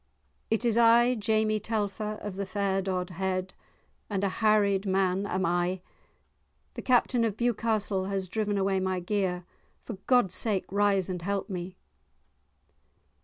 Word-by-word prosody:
"It 225 +2 0
is 235 -1 +3
I, 235 +1 +5
Jamie 215 -1 +1
Telfer, 210 0 -2
of 205 -3 -6
the 200 0 -4
fair 195 -1 0
Dodhead, 185 0 -3 0.6
and 200 -2 -2
a 200 - +2
harried 205 -1 +2
man 190 +1 +1
am 185 0 -1
I. 175 +2 0 0.9
The - - -6
Captain 245 -1 +2
of 220 -2 -1
Bewcastle 215 -4 0
has 195 -1 -2
driven 205 +1 -1
away 195 0 +1
my 185 -1 -1
gear; 180 -1 -1 0.4
for 225 - -7
God's 245 -8 +3
sake 200 -1 +1
rise 200 -2 +2
and 180 -2 -4
help 200 +3 -3
me." 180 0 -5
200 Hz, 140 wpm, -28 LUFS, 185-215 Hz, 0.9 s, I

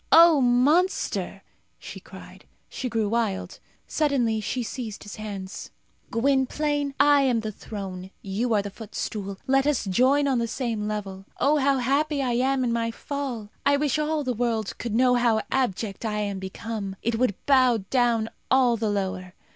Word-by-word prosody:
"O 330 -3 +8
monster!" 280 +10 +2 0.3
she - - -9
cried. - - -13 0.2
She 255 - -4
grew 225 -2 0
wild. 220 -3 -2 0.3
Suddenly 245 -8 +1
she 250 +3 -2
seized 225 -1 -6
his 205 - -9
hands. 200 -3 -6 0.4
"Gwynplaine, 280 +3 0
I 290 -1 +6
am 250 -4 +2
the 215 -1 -4
throne; 190 -3 -7
you 210 +5 -2
are 205 - +2
the 205 - -6
footstool. 205 -2 -5
Let 270 +1 +2
us 290 -7 +1
join 260 +9 +3
on 260 -3 +2
the 230 - 0
same 225 -3 -2
level. 195 -2 -5
Oh, 295 +2 +3
how 275 -1 +2
happy 280 +4 +1
I 250 - 0
am 260 +2 +1
in 235 -2 0
my 230 0 0
fall! 245 -3 -5
I 285 0 +4
wish 295 0 0
all 305 0 0
the 255 -2 -1
world 225 -3 -1
could 230 -2 -3
know 250 +1 +4
how 235 -3 +3
abject 225 -6 -1
I 215 -2 -2
am 200 -2 -3
become. 195 +1 -5
It 230 -1 0
would 250 -6 +2
bow 255 -6 +4
down 240 -3 +2 0.2
all 250 -3 +4
the 220 -1 -1
lower. 185 -2 -3
235 Hz, 170 wpm, -25 LUFS, 210-270 Hz, 0.4 s, O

